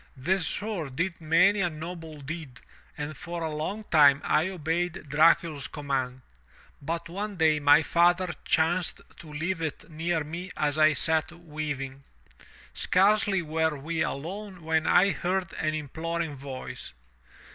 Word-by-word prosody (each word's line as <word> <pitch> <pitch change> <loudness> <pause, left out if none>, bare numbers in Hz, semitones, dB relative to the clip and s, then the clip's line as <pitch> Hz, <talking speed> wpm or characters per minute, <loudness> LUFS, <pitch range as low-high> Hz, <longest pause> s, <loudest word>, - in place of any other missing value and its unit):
The 180 +9 +1
sword 170 -6 -3
did 170 +2 -2
many 180 +6 +4
a 175 - +2
noble 160 -1 -8
deed 140 -3 -7 0.4
and 150 +1 -4
for 170 -1 -5
a 160 - -2
long 185 +8 -3
time 145 -7 +6
I 155 +4 +2
obeyed 175 0 -2
Dracul's 155 -1 +3
command. 130 -3 -3 0.6
But 165 +4 -3
one 200 +4 -4
day 160 -3 +3
my 145 +2 +6
father 175 +4 +3
chanced 165 +2 +1 0.2
to 160 -3 -11
leave 165 +3 -2
it 160 +1 -5
near 160 +1 -1
me 170 +5 -6
as 150 0 0
I 155 0 +6
sat 160 +3 +2
weaving. 150 -5 -5 0.7
Scarcely 195 0 +3
were 160 -1 0
we 160 +3 -3
alone 185 +5 -4
when 160 0 +1
I 195 +3 +5
heard 180 -1 -2
an 155 0 0
imploring 160 +1 -3
voice. 135 - -7
160 Hz, 140 wpm, -27 LUFS, 150-175 Hz, 0.7 s, time